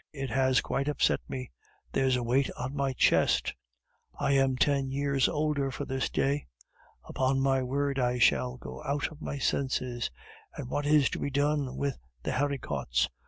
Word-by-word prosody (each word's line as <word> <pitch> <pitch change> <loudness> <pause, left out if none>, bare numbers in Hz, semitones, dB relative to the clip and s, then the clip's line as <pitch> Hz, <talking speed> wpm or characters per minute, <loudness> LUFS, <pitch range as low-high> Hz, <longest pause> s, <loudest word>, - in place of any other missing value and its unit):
It 135 -4 -4
has 130 +1 +3
quite 140 +1 -2
upset 150 -2 +2
me! 130 -1 -5 0.4
There's 130 -1 +2
a 125 - -1
weight 130 +3 +2
on 130 +3 -4
my 140 -1 0
chest! - - +3 0.7
I - - +1
am 135 -1 +3
ten 140 0 +2
years 140 -1 +1
older 150 -2 0
for 140 +2 -5
this 130 0 -1
day! 140 +1 0 0.6
Upon 135 +1 0
my 135 -1 +2
word, 140 +2 -1
I 125 -1 +1
shall 65 - +3
go 65 +1 -9
out 145 +3 -1
of 155 0 -13
my 140 - -4
senses! 130 -3 -1 0.5
And 125 - -6
what 145 +2 -1
is 150 -2 +5
to - - -3
be - - -1
done 140 -1 0
with 140 -2 -2 0.2
the - - -1
haricots! 125 - 0
135 Hz, 170 wpm, -29 LUFS, 130-140 Hz, 0.7 s, is